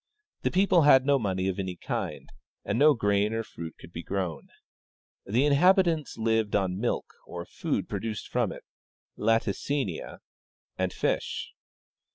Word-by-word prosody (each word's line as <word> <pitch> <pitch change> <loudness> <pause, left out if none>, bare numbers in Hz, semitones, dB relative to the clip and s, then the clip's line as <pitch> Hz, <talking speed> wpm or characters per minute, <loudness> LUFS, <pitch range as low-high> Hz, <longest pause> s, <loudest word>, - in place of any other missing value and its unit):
The - - +1
people 185 -2 +4
had 135 -3 +6
no 140 -1 +4
money 95 -4 -1
of 95 0 -2
any 95 -2 -3
kind, - - -4 0.4
and 110 +4 -1
no 150 +1 +6
grain 100 -1 +1
or 115 - -1
fruit 80 -6 -8
could 85 - -14
be 85 - -5
grown. 90 -5 -4 0.8
The 120 +8 +2
inhabitants 165 +1 +3
lived 110 -2 +1
on 95 -2 0
milk, 120 - -2
or 85 0 -6
food - - -3
produced 110 -2 -4
from - - 0
it - - -9 0.5
(latimiia), 115 - -1 0.6
and 95 -1 -1
fish. - - -2
110 Hz, 145 wpm, -28 LUFS, 95-140 Hz, 0.8 s, had